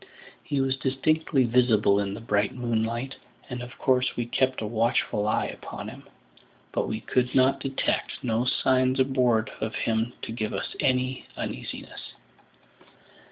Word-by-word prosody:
He 140 - -1
was 135 0 0
distinctly 135 +2 +2
visible 115 -4 +4
in 100 -1 -2
the - - -7
bright 105 -2 +1
moonlight, 120 +1 -1 0.3
and 125 0 -4
of 120 0 -9
course 130 -1 +2
we 120 - -1
kept 130 +2 +1
a 110 - -3
watchful 110 -1 +1
eye 110 - +2
upon - - -7
him; - - -12 0.7
but - - 0
we 110 0 -3
could 125 +2 +1 0.3
detect 135 0 -1
no 115 0 +1
signs 130 +1 +2
aboard 125 -4 +2
of 110 0 -2
him 115 +1 0
to - - -4
give 110 -3 -2
us 95 - -4
any 130 0 0
uneasiness. - - -6
120 Hz, 145 wpm, -27 LUFS, 110-130 Hz, 0.7 s, visible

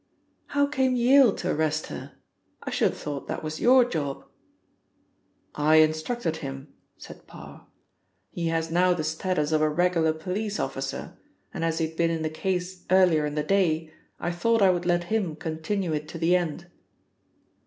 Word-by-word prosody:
"How 285 - +5
came 265 -3 +1
Yale 250 0 +6
to 180 - -2
arrest 155 0 0
her? - - -8 0.5
I - - -5
should - - +2
have - - -8
thought 145 -2 -6
that - - -4
was 155 0 -5
your 255 0 +6
job?" 145 - -4 1.3
"I 150 +1 +3
instructed 155 +4 +2
him," 135 -1 -8 0.2
said - - -13
Parr. - - -13 0.6
"He 170 -1 -3
has 165 0 -1
now 180 +1 +3
the 160 - -3
status 160 -1 -1
of 155 -1 +2
a 155 - +3
regular 165 0 +2
police 200 +6 -4
officer, - - -4 0.3
and 170 -6 -4
as 165 -1 0
he 160 -1 0
had 160 0 -14
been 170 -1 +2
in 165 -1 -2
the 155 - -2
case 180 +2 -3
earlier 180 -5 +4
in 145 - -5
the 150 - 0
day, 160 -3 +1 0.3
I 175 - -2
thought 220 +5 +2
I 190 - +6
would 175 -1 -2
let 175 0 +2
him 190 -8 0
continue 160 +3 -3
it 150 0 -3
to 165 - -8
the 170 +2 +3
end." 175 -1 -2
165 Hz, 175 wpm, -26 LUFS, 155-185 Hz, 1.3 s, Yale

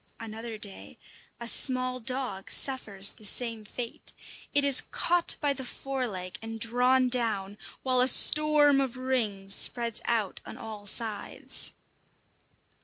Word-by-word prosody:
Another 225 0 -8
day 205 -2 -10 0.4
a 235 - -7
small 255 +1 +3
dog 250 -5 -4
suffers 205 -8 +3
the - - -19
same 225 +1 -2
fate. 230 +2 -8 0.4
It 285 - +2
is 280 -2 +4
caught 350 0 +1
by 290 -2 0
the 265 -1 -7
fore 265 0 -4
leg 185 -4 -7
and 225 0 -7
drawn 250 +3 +2
down, 215 -5 -1 0.2
while 255 -1 +2
a 250 - +4
storm 295 +1 +5
of 260 -2 -4
rings 215 -7 -1
spreads 235 +1 +2
out 225 -5 -2
on - - -10
all 215 -2 -9
sides. 220 0 -2
235 Hz, 135 wpm, -27 LUFS, 215-260 Hz, 0.4 s, storm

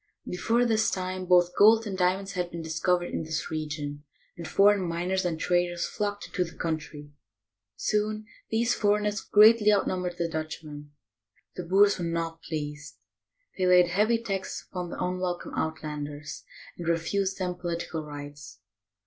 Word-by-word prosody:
Before 230 +7 +1
this 220 -1 +2
time, 185 0 -3
both 180 0 +4
gold 220 +2 +6
and 200 -3 -4
diamonds 190 +2 +1
had 180 -2 -2
been 170 -1 -6
dis 160 0 -4
covered 180 -1 +1
in - - -1
this 160 0 -4
region, 150 -2 -4 0.3
and 170 -2 -7
foreign 205 0 +4
miners 180 +2 -1
and 165 -2 -1
traders 175 0 +1
flocked 205 -1 -3
into 180 - -1
the 165 - -10
country. 155 -3 -4 0.6
Soon 215 - -1 0.2
these 230 +2 +2
foreigners 210 0 +1
greatly 210 0 +6
outnum 190 -2 +1
bered 175 -1 -4
the 170 - 0
Dutchmen. 155 -2 -6 0.7
The 180 - -5
Boers 200 +3 +4
were - - -2
not 165 -1 -3
pleased. 150 -2 -6 0.6
They 185 - +2
laid 180 -1 +6
heavy 210 +6 +3
taxes 195 -5 -4
upon 180 -2 -4
the - - -6
unwelcome 180 -1 -3
"Outlanders," 150 -2 -4 0.3
and 170 - -5
refused 190 +4 0
them 180 -1 -2
political 170 -2 -4
rights. 145 -5 -9
180 Hz, 155 wpm, -27 LUFS, 160-200 Hz, 0.7 s, gold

